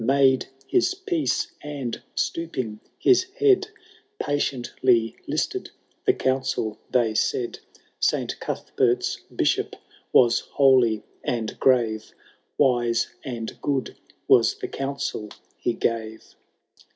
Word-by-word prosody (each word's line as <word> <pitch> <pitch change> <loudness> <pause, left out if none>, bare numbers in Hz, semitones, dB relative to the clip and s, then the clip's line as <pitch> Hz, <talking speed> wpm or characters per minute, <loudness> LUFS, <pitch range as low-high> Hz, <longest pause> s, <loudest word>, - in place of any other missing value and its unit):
Made 135 +1 +4 0.2
his 370 +1 +2
peace, 370 -5 -1
and, 140 -5 -5
stooping 130 -5 -2 0.2
his 370 -1 +4
head, 410 -3 +4 0.5
Patiently 125 -4 +1
listed - - -2 0.4
the - - +6
counsel 130 -4 -1
they 120 -3 +2
said: 120 +2 0 0.4
Saint - - 0
Cuthbert's - - 0
Bishop - - +1 0.4
was 120 -2 +5
holy 130 -6 +3 0.2
and 115 -3 -2
grave. 115 -4 +2 0.4
Wise 120 -4 +2
and 115 -4 -6
good 140 -2 -1 0.3
was - - +5
the - - -5
counsel 135 -6 -3 0.3
he 120 - -1
gave. 110 -2 -3
130 Hz, 100 wpm, -25 LUFS, 115-140 Hz, 0.5 s, the